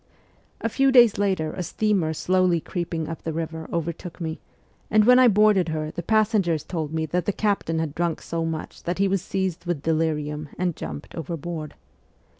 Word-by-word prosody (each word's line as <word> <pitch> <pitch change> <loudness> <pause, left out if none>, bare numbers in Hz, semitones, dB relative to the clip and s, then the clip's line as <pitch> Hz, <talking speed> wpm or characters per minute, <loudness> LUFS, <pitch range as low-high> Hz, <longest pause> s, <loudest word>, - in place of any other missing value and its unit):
A - - 0
few 270 +4 +2
days 240 -6 +6
later 190 -6 0
a 185 - -4
steamer 190 -2 0
slowly 180 +1 +2
creeping 165 -2 -3
up 165 0 -6
the 165 - -3
river 160 0 -5
overtook 170 +1 -4
me, 160 -2 -4 0.5
and 215 0 +4
when 250 +2 +7
I 255 - +7
boarded 210 -5 +4
her 155 -1 -3
the 175 - -5
passengers 200 - +2
told 155 -4 -4
me 160 0 -1
that 170 +3 -2
the - - +3
captain 200 -6 0
had 160 -3 -2
drunk 170 0 -1
so 165 0 -2
much 160 -1 -5
that 175 - -1
he 195 +1 +3
was 195 -1 0
seized 190 -2 -3
with 170 -5 -2
delirium 155 -2 -1
and 175 -3 0
jumped 75 -2 -7
overboard. 165 -1 -5
170 Hz, 185 wpm, -24 LUFS, 160-195 Hz, 0.5 s, when